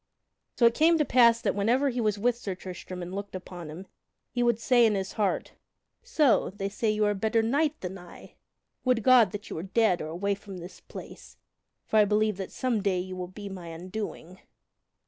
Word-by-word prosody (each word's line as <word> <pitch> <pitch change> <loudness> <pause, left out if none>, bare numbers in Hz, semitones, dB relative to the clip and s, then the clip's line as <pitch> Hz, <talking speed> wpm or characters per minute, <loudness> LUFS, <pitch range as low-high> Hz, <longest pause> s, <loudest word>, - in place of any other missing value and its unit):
So 240 - +4
it 230 - +6
came 325 +5 +4
to 300 - +2
pass 235 -2 +5
that - - 0
whenever 240 +8 +2
he 245 0 -2
was 210 -2 +1
with 240 +3 +1
Sir 200 -6 -5
Tristram 180 0 -8
and 175 +1 -7
looked 200 0 -6
upon 175 -3 -8
him, 170 +5 -8 0.5
he 245 - -1
would 235 -2 +2
say 240 +1 +4
in 220 -2 +4
his 190 -1 -3
heart: 205 -3 -1 0.5
"So 320 - +2
they 195 0 -4
say 210 +3 -2
that 215 - +1
you 210 0 +2
are 205 - +2
a - - 0
better 220 +3 +1
knight 290 +6 +1
than 185 +1 -6
I? 175 -1 -13 0.5
Would 250 -4 +2
God 230 -5 +5
you - - -6
were 160 - -4
dead 195 0 +1
or 155 - -4
away 185 +5 -1
from 200 -1 -9
this 175 +1 -10
place, - - -11 0.5
for 220 - +1
I 210 - +6
believe 210 -1 +1
that 190 -2 -6
some 245 -5 -1
day 195 -2 +1
you 185 +1 -4
will 180 -1 -5
be 200 +3 -9
my 185 -3 -8
undoing!" 180 +1 -7
205 Hz, 215 wpm, -28 LUFS, 185-235 Hz, 0.5 s, it